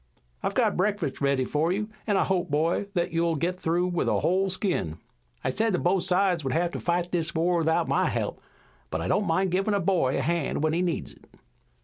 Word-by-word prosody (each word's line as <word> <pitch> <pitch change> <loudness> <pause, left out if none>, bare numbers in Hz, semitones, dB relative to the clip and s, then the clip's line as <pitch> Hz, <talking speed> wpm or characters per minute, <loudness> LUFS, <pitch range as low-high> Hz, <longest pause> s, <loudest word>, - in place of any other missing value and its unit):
"I've - - -2
got - - +2
breakfast 190 -8 -1
ready 140 -2 +2
for 155 +6 0
you, 210 +3 -1 0.2
an' 205 -2 +2
I - - +3
hope, 180 -2 0
boy, 160 +7 +1
that 175 -1 0
you'll 165 0 +1
get 175 +5 -2
through 175 +2 +1
with 175 -2 -1
a - - +1
whole 190 +2 +2
skin. 180 - -1 0.5
I 130 - 0
said 220 - 0
that 180 - 0
both 180 +1 +2
sides 180 -2 +2
would 135 -2 -1
have 170 +1 +1
to - - -5
fight 175 0 -1
this 170 -1 -1
war 170 +2 +2
without 160 0 +1
my - - +2
help, - - -3 0.5
but 80 - -2
I 85 - -2
don't 205 - +1
mind 185 +3 +1
givin' 195 +3 +1
a - - +2
boy 170 -8 +1
a - - 0
hand 170 -3 -1
when 155 0 +2
he 170 - +1
needs 175 -2 -2
it." - - -21
175 Hz, 230 wpm, -26 LUFS, 160-185 Hz, 0.5 s, I